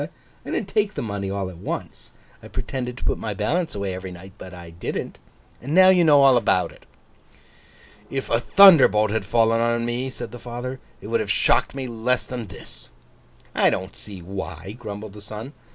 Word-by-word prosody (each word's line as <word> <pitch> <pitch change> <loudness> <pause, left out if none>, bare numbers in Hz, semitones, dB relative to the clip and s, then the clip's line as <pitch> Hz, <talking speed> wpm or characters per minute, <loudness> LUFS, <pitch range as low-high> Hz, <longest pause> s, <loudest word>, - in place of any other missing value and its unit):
I - - -9
didn't 195 - -2
take 210 +1 0
the - - -3
money 100 -3 -3
all 100 -1 -2
at 85 - -13
once. - - -6 0.3
I - - -11
pretended 125 -2 -4
to - - -8
put - - 0
my 105 -2 -4
balance 160 - -1
away 100 -2 -2
every 95 0 -6
night, 90 +2 -11
but 95 - -9
I 85 -2 -10
didn't. 85 +1 -5 0.4
Now 180 +9 +5
you 180 -2 +5
know 145 -3 +6
all 135 -2 +7
about 90 -6 +2
it.' - - -19 1.2
'If 135 -1 -4
a 115 - +3
thunderbolt 130 - +7
had 110 -2 -1
fallen 115 +1 +3
on 115 0 +1
me,' 120 +2 -2
said 120 -3 -7
the 120 - -9
father, 125 +2 -6 0.2
'it - - -11
would 115 +1 +1
have 110 -2 -3
shocked 100 - +2
me 135 -1 -3
less 120 +1 0
than 120 -4 -6
this!' 60 -9 -11 0.6
'I - - +4
don't 95 +1 -3
see 95 -4 -9
why,' 95 0 -6
grumbled 105 -2 -7
the 105 - -11
son. 110 +6 -8
115 Hz, 195 wpm, -23 LUFS, 100-130 Hz, 1.2 s, all